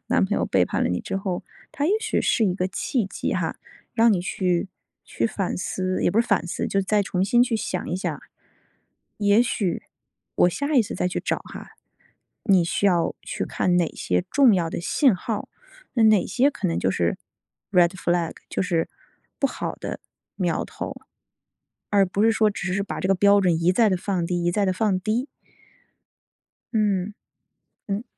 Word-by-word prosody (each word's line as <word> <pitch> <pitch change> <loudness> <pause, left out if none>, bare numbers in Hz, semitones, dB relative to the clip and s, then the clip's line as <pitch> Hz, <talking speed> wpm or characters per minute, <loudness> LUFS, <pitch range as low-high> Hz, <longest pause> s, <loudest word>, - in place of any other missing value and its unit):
男 - - +3
朋 - - -1
友 - - +1
背 - - +3
叛 - - -2
了 - - +1
你 90 - -1
之 - - -4
后， 190 -2 -3 0.3
它 290 - -1
也 - - +2
许 445 - 0
是 230 - +2
一 185 -3 +1
个 185 0 -1
契 220 +3 -1
机 195 - -3
哈， - - -2 0.4
让 230 -1 +5
你 185 - +1
去 180 0 -1 0.4
去 - - -1
反 195 -4 -2
思， 185 +1 -2
也 - - +3
不 215 - +3
是 235 - -1
反 200 -4 +1
思， 175 - -3
就 195 - +1
再 205 +2 +2
重 185 -1 -1
新 240 +5 +4
去 240 -2 +1
想 185 -4 -3
一 180 - -1
想。 190 - -3 1.0
也 205 +1 +4
许 200 -7 -1 0.5
我 - - +4
下 285 - -2
一 255 - +6
次 205 - -6
再 180 - -1
去 180 - -2
找 - - -1
哈， - - -10 0.8
你 190 -5 +4
需 170 +4 -1
要 175 -4 +2
去 - - -4
看 180 - 0
哪 175 -2 +2
些 90 0 0
重 265 -5 +5
要 170 -3 +1
的 - - -4
信 240 - +3
号， 210 +3 -4 0.4
那 230 - +3
哪 215 -4 +5
些 270 +3 +2
可 200 - -2
能 165 - -1
就 95 - +1
是 85 -2 0 0.5
red 175 -3 +5
flag， 175 -2 -1 0.2
就 - - -1
是 170 -3 0 0.5
不 275 - +3
好 - - -4
的 - - -6 0.4
苗 175 -4 0
头。 - - -6 0.9
而 200 -1 +4
不 190 +2 -2
是 225 +1 +5
说 215 -1 +3
只 190 -2 -3
是 200 +1 0
把 195 - -5
这 185 - -1
个 195 - +3
标 200 +2 +5
准 170 -4 +1
一 175 - +5
再 220 +4 +4
地 190 - +2
放 180 -1 -2
低 175 0 -1
一 175 - +2
再 200 +3 +1
地 185 - +1
放 195 -1 +1
低。 220 +7 -1 1.5
嗯， 205 -2 +1 0.7
嗯。 200 +2 -2
195 Hz, 220 characters per minute, -24 LUFS, 180-215 Hz, 1.5 s, 一